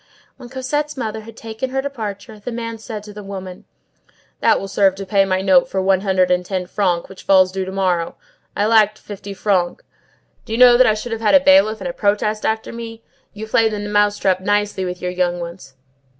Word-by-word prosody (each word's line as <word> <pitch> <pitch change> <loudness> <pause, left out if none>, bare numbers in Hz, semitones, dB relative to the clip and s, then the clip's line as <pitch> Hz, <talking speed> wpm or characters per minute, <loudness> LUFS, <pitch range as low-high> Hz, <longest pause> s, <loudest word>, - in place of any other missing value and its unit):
When 245 -2 -11
Cosette's 280 +3 -3
mother 220 -3 -4
had 225 +1 -13
taken 225 +3 -5
her 265 +1 -2
departure, 220 -5 -6
the 225 +4 -6
man 230 -1 -5
said 215 -2 -7
to 210 -1 -11
the 210 - -8
woman:— 190 -2 -8 0.7
"That - - +3
will 195 - -6
serve 195 -1 +2
to 195 0 -7
pay 195 0 +3
my 185 -1 0
note 190 -2 +4
for 190 - -2
one 190 0 +2
hundred 185 -2 +1
and 180 0 +2
ten 185 0 -3
francs 180 -2 -1
which 190 - -12
falls 185 -1 +4
due 190 0 -3
to 190 - -6
morrow; 180 -3 -1 0.4
I 205 - +2
lacked 215 -1 +4
fifty 200 -1 -9
francs. 185 -3 0 0.6
Do 220 - -7
you - - 0
know 250 -1 +8
that 255 +1 +5
I 215 - +3
should 225 +3 -6
have 225 0 -3
had 225 +5 +4
a - - +9
bailiff 275 -7 +4
and 185 - -3
a 175 - -4
protest 210 +2 0
after 220 +1 -2
me? 230 -1 -8 0.3
You 210 +1 -7
played 220 0 +2
the 210 - -3
mouse 205 0 +1
trap 185 -1 +1
nicely 205 -1 0
with 180 0 -6
your 180 - -1
young 180 -1 -1
ones." 170 -5 -9
205 Hz, 220 wpm, -19 LUFS, 190-225 Hz, 0.7 s, a